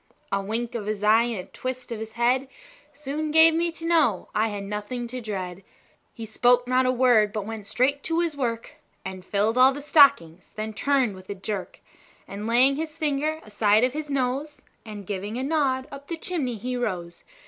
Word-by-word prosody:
A 195 0 +1
wink 230 +4 -3
of 220 -4 -4
his 210 -1 -3
eye, 220 +2 +5
and 225 -6 -4
a - - -31
twist 255 -1 -5
of 230 - -4
his 220 0 -7
head, 245 +3 +1 0.4
Soon 300 +2 -4
gave 320 +1 +6
me 335 +1 0
to 330 - -8
know 310 - +2
I 220 +1 +2
had 205 -2 -5
nothing 210 +4 -4
to 250 +1 -6
dread. 190 -4 -5 0.5
He 230 - -8
spoke 245 +3 +3
not 255 0 +2
a - - +3
word, 240 -5 +4
but 210 -2 -4
went 220 -2 -7
straight 270 +6 +1
to 330 0 0
his 335 -3 0
work, 235 -4 -3 0.3
And 190 -1 -6
filled 210 +5 0
all 260 +1 +7
the 285 - -6
stockings; 185 - +4
then 215 0 -4
turned 265 -2 +1
with 185 0 -14
a 200 - -4
jerk, 195 0 -6 0.5
And 205 +2 -6
laying 255 +4 +4
his 315 0 -5
finger 310 0 -1
aside 210 +1 +2
of 250 0 +2
his 300 0 -5
nose, 275 +2 -2 0.2
And 205 -2 -8
giving 205 +3 -4
a 260 - -2
nod, 270 -3 0
up 280 0 -10
the 335 - -4
chimney 305 -9 -3
he 250 +4 -4
rose. 180 -8 -4
240 Hz, 205 wpm, -25 LUFS, 210-280 Hz, 0.5 s, all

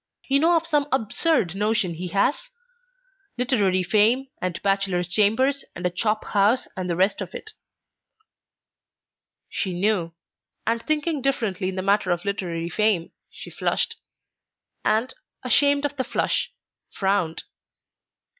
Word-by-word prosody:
You 275 +1 +3
know 335 +3 +4
of 330 - -2
some 295 -3 +1
absurd 225 - +1
notion 210 -2 0
he 180 +3 -5
has? 200 - 0 0.9
literary 205 -7 +2
fame, 225 +8 +3
and 180 -2 -2
bachelor's 195 -3 +1
chambers, 225 +9 +2
and 175 - -5
a 180 - +1
chop 215 +4 -1
house, 210 +5 +2
and 185 -2 -4
the 170 - 0
rest 195 +3 +1
of 185 - -6
it." 435 - -8 2.0
She 180 -3 -3
knew, 180 -5 0 0.5
and 230 +1 0
thinking 305 +1 0
differently 215 -8 -1
in 190 - -5
the 185 - -3
matter 200 -1 +2
of 175 +2 -1
literary 175 -4 -2
fame, 205 -3 +1 0.2
she - - -11
flushed, - - -1 0.9
and, 230 +4 +1 0.3
ashamed 285 +3 +3
of 290 0 -3
the 260 - 0
flush, - - -1 0.4
frowned. 190 -4 -1
210 Hz, 135 wpm, -24 LUFS, 185-260 Hz, 2.0 s, know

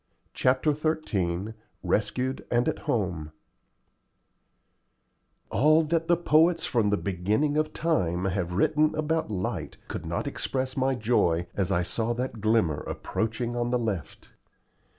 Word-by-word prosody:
CHAPTER 130 +4 +2
XIII 110 - -1 0.3
RESCUED 125 +5 -1
AND 120 0 +2
AT - - -1
HOME 85 -9 -1 2.2
All 155 +3 +4
that 165 +1 0
the 175 - +4
poets 165 +1 +3
from 115 -5 +1
the 105 - +2
beginning 105 - 0
of 155 0 +1
time 95 - 0
have 90 -2 -1
written 155 - +2
about 155 -1 0
light 95 -3 -3
could - - -5
not - - -2
express 130 -1 -2
my 135 0 +1
joy 95 -8 +2
as 95 -3 -1
I 85 - +2
saw 115 +6 -1
that 120 -3 -4
glimmer 110 -9 +2
approaching 115 +2 -3
on 120 0 0
the 125 - +2
left. 105 - -4
120 Hz, 130 wpm, -27 LUFS, 95-150 Hz, 2.2 s, All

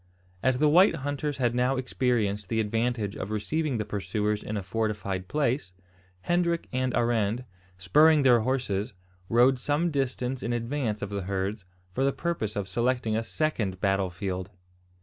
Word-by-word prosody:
As 130 -1 +2
the 150 +3 +3
white 175 +4 +6
hunters 145 0 -3
had 120 -3 +1
now 125 +2 +2
experienced 115 -6 0
the 115 - 0
advantage 115 -1 -1
of 95 - -5
receiving 135 +6 -1
the 105 - -2
pursuers 105 +2 -1
in 105 - -4
a 100 - -3
fortified 100 -2 -2
place, 130 -9 -1 0.5
Hendrik 175 - 0
and 130 0 0
Arend, 115 0 +1 0.3
spurring 150 - +5
their 125 -3 +6
horses, 110 -3 -1 0.4
rode 125 +3 +4
some 150 +6 0
distance 130 -2 -2
in 120 - -2
advance 115 -2 -2
of 100 - -4
the 100 -1 -2
herds, 95 +2 -3 0.3
for 130 - 0
the 135 - +3
purpose 140 -11 -3
of 100 -2 -2
selecting 120 +2 0
a 110 - +1
second 115 - -1
battle 95 -1 +1
field. 95 +1 -4
115 Hz, 160 wpm, -27 LUFS, 100-135 Hz, 0.5 s, white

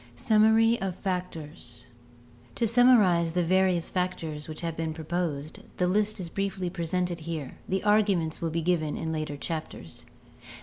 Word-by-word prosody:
Summary 220 - +4
of 190 -2 -2
Factors 160 - -5 0.7
To 235 - +1
summarize 210 -8 +5
the 180 0 +1
various 185 -1 +2
factors 165 -5 -3
which 155 -1 -7
have 165 -2 -3
been 160 -1 -3
proposed, 160 -2 -3 0.2
the 180 - +2
list 210 +3 +1
is 180 - -4
briefly 190 0 -3
presented 175 +1 -2
here; 155 -4 -6
the 190 0 0
arguments 200 -6 +2
will 165 - 0
be 165 +1 -2
given 160 -3 0
in 160 - -3
later 155 -2 -3
chapters. 155 - -6
175 Hz, 145 wpm, -27 LUFS, 160-190 Hz, 0.7 s, summarize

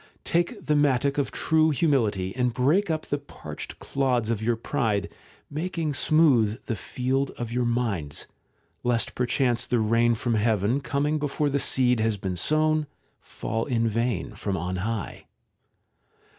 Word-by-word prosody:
Take 170 +1 -1
the 150 - +2
mattock 140 -1 +2
of 140 - 0
true 160 0 +2
humility, 115 - +1
and 125 -1 +1
break 165 +10 +2
up 155 -1 -1
the 145 - -2
parched 145 - -9
clods 125 -4 0
of 110 -2 -2
your 115 +1 +1
pride, 110 -5 -1 0.4
making 160 0 -3
smooth 130 -8 +3
the 115 - -2
field 130 +5 -1
of 120 -1 -4
your 125 0 0
minds, 110 -12 -2 0.6
lest 120 -1 0
perchance 125 -1 +1
the 120 - +1
rain 115 +2 +3
from 120 +1 -1
heaven, 110 +2 +2
coming 145 +4 0
before 145 0 0
the 140 0 0
seed 125 -3 +2
has 110 -1 +1
been 95 -2 -3
sown, 155 - +2 0.3
fall 115 +1 -4
in 115 -4 +1
vain 115 -3 -1
from 100 -2 -3
on 90 +2 -3
high. 110 +1 -4
125 Hz, 150 wpm, -26 LUFS, 110-145 Hz, 0.6 s, smooth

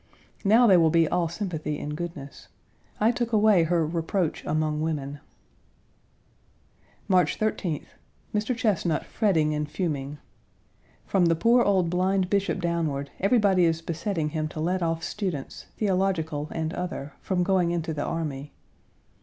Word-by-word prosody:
Now, 220 +4 +5
they 195 -5 +7
will 165 -2 +5
be 165 0 +3
all 175 +1 +1
sympathy 165 -5 -3
and 150 0 -4
goodness. 150 -5 -7 0.5
I 220 +2 +4
took 240 -1 -2
away 210 -5 +4
her 165 -1 +1
"reproach 165 +2 -1
among 155 0 0
women." 145 -3 -3 1.9
March 185 -2 +3
13th. 185 -8 -2 0.5
Mr. 215 +3 -1
Chesnut 185 -9 0
fretting 160 -8 +1
and 150 0 -2
fuming. 150 -4 -3 0.9
From 180 -3 +2
the 165 - +3
poor 235 +8 +4
old 185 -5 +2
blind 185 +1 +1
bishop 200 -2 +1
downward 160 -5 -2
everybody 200 -3 +3
is 165 -1 +1
besetting 165 -1 -2
him 155 0 -2
to 155 - -8
let 180 +4 0
off 165 -1 -1
students, 180 -10 -4
theological 180 -7 0
and 160 0 -3
other, 175 -6 -5
from 180 -2 0
going 185 -2 +2
into 165 -1 -2
the 145 -1 -3
army. 150 -4 -4
170 Hz, 140 wpm, -26 LUFS, 155-195 Hz, 1.9 s, they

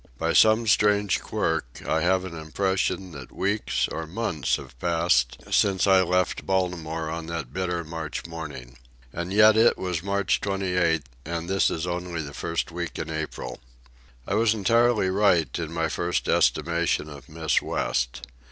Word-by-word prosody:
By 80 +3 0
some 110 +1 +5
strange 105 -2 +3
quirk, 75 -7 -2
I 80 - +1
have 95 +2 +2
an 90 -3 -7
impression 95 +3 -1
that 70 -5 -10
weeks, 100 +2 0
or 80 -1 -5
months, 80 - -1
have - - -9
passed 80 -8 +2
since 95 -2 +3
I 95 -1 +5
left 90 0 0
Baltimore 85 -4 -1
on 80 0 -5
that 80 -6 -5
bitter 90 -2 -2
March 80 -1 -5
morning. 70 -7 -8 0.3
And 85 +2 -4
yet 105 +1 +6
it 115 +2 +5
was 90 -3 -2
March 100 0 0
28, 90 -5 0 0.2
and 85 +1 -4
this 95 +1 +2
is 80 +1 -3
only 90 -2 -3
the 70 -1 -8
first 85 +3 -3
week 85 -1 -5
in - - -4
April. 80 -1 -5 0.7
I - - -3
was 110 +1 +3
entirely 115 -1 +3
right 95 -4 +2
in 80 -2 -4
my 85 -1 0
first 85 +2 -2
estimation 85 0 +1
of 75 0 -11
Miss 80 0 0
West. - - -2
85 Hz, 160 wpm, -25 LUFS, 80-95 Hz, 0.7 s, yet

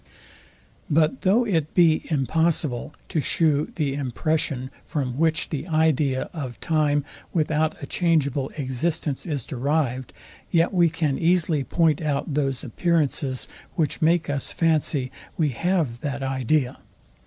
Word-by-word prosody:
But 155 - +2
though 215 +6 +3
it 165 -8 -1
be 165 -3 +4
impossible 155 -2 0
to 155 - 0
shew 150 -1 +1
the 145 -4 0
impression, 140 0 -1
from 135 -4 -3
which 160 0 +2
the 155 +2 -4
idea 155 -5 +2
of 135 -7 -6
time 150 -3 +1 0.3
without 155 -1 +1
a - - -2
changeable 145 -5 +1
existence 145 +2 -1
is 145 -7 -2
derived; 130 -2 -1 0.4
yet 170 +2 +2
we 175 -2 +4
can 155 -4 -1
easily 165 -4 +2
point 160 +1 +2
out 150 0 -1
those 135 -2 0
appearances, 140 -2 0 0.3
which 155 -4 -1
make 165 +1 +3
us 140 -2 -2
fancy 155 -5 +1 0.3
we 155 -3 +2
have 150 -3 0
that 140 0 -3
idea. 130 0 0
150 Hz, 130 wpm, -24 LUFS, 135-165 Hz, 0.4 s, be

